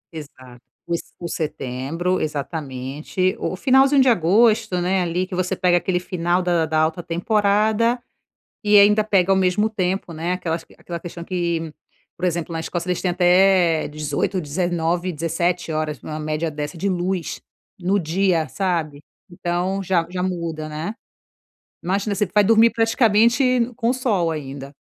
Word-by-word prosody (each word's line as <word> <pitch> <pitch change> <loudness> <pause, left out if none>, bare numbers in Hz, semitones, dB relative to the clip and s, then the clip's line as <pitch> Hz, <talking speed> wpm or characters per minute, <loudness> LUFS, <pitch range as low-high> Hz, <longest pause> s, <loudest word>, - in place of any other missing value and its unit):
Exato, 130 -5 -11 0.2
os 170 -1 -1 0.2
o 170 - -5
setembro, 155 +4 -2
exatamente. 150 +3 -3
O - - -2
finalzinho 270 +5 +4
de 260 - +5
agosto, 215 +1 +3
né? 185 +2 +1
Ali 175 +1 -1
que 185 - -11
você 180 0 -1
pega 175 -1 +3
aquele 180 0 0
final 180 0 -1
da 170 -3 +1
da 155 0 0
alta 160 +2 0
temporada 210 +6 +1 0.6
e 210 0 +5
ainda 210 +1 +6
pega 195 -3 +2
ao 190 - +3
mesmo 190 +4 +2
tempo, 185 -3 -2
né, 165 +3 -2
aquela 170 -3 -2 0.2
aquela 170 -1 -7
questão 170 0 -8
que, 170 -3 -2 0.5
por 180 - -1
exemplo, 170 -1 -2
na 165 - -3
Escócia 170 +2 -4
eles 180 - -1
têm 180 -2 0
até 180 -2 +4
18, 150 +5 -2
19, 175 +2 -1
17 170 +2 -1
horas, 155 -3 -2
em 155 0 -5
média, 155 +2 -2
de 155 +5 -4
luz 180 -2 -2 0.4
no 190 +3 +1
dia, 170 -1 +1
sabe? 165 -7 -2 0.3
Então 175 +3 -2
já, 175 -3 +1
já 180 0 -3
muda, 170 -4 -3
né? 155 +7 -5 0.9
Imagina, 200 +3 -1
você 205 +1 0
vai 205 +3 +3
dormir 225 +2 +5
praticamente 235 +2 +3
com 235 -1 +1
sol 205 -10 0
ainda. 140 -2 -7
180 Hz, 150 wpm, -21 LUFS, 160-195 Hz, 0.9 s, ainda